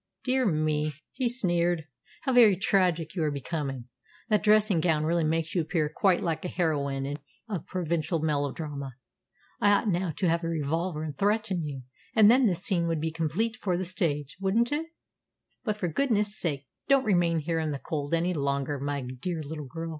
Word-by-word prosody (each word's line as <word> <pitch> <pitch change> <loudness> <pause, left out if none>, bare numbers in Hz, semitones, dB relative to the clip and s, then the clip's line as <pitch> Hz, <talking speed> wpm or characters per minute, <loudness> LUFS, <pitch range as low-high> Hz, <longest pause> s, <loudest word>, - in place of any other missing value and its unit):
"Dear 255 -1 +2
me," 155 -3 0 0.2
he 255 -2 0
sneered, 175 -8 0 0.4
"how 265 - 0
very 230 -5 +7
tragic 180 -4 +1
you 180 - -2
are 155 - +2
becoming! 140 -3 -4 0.4
That 210 -2 +3
dressing 210 -3 +4
gown 160 -2 +2
really 165 +1 +1
makes 160 +1 0
you 175 - +2
appear 155 -1 -1
quite 190 -3 +3
like 165 +2 -2
a - - -2
heroine 145 -5 -1 0.3
of 195 -8 -4
provincial 170 -2 -1
melodrama. 145 -2 -2 0.6
I 205 - +4
ought 205 - +2
now 180 -1 0
to 185 - +1
have 170 +1 +1
a - - -1
revolver 160 +1 -1
and 150 -2 -5
threaten 205 -1 0
you, 140 -4 -5 0.3
and 220 -1 +8
then 255 +1 +5
this 185 -4 +1
scene 175 -4 +2
would 165 -1 0
be 160 +1 -1
complete 165 +8 -1
for 180 -3 -1
the 185 - -2
stage 155 -6 -1
wouldn't 225 +6 +2
it? 310 +3 -1 0.8
But 215 -4 -1
for 185 - -1
goodness' 210 - +1
sake 145 -8 -2 0.2
don't 275 -2 +4
remain 175 -4 +3
here 165 +1 -1
in 160 -1 -1
the 145 - -2
cold 145 +2 -2
any 175 +2 0
longer, 140 -1 -1
my 140 0 -2
dear 140 +7 -4
little 150 -1 -6
girl. 165 +5 -5
165 Hz, 185 wpm, -28 LUFS, 150-195 Hz, 0.8 s, and